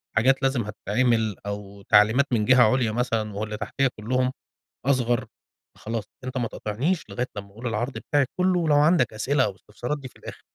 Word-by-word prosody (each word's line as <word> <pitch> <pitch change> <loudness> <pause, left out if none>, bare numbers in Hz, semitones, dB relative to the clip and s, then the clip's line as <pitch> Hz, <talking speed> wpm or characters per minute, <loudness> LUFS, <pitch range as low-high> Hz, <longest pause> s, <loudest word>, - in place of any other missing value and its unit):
حاجات 130 +5 +3
لازم 135 -2 +2
هتتعمل، 110 +1 0
أو 100 -1 -6
تعليمات 110 +6 +5
من 110 -3 +2
جِهَة 130 +1 +6
عُليا 125 -4 +1
مثلًا، 115 -2 -1
واللي 105 0 -3
تحتِيّا 120 +6 0
كُلُّهُم 125 +4 0 0.5
أصغر 125 -3 +2 0.5
خلاص 110 0 -4 0.2
أنت 130 0 -4
ما 120 -2 0
تقاطعنيش 135 - -2
لغاية 125 +1 -2
لمّا 100 0 -6
أقول 115 +5 -7
العرض 120 +4 -2
بتاعي 145 -2 +1
كُلُّه، 180 0 +3
ولو 155 -3 +2
عندك 150 -4 +4
أسئلة 130 +6 +1
أو 100 - -2
استفسارات 120 +9 -5
دي 135 - -8
في - - -19
الآخر. - - -10
120 Hz, 175 wpm, -25 LUFS, 105-130 Hz, 0.5 s, جِهَة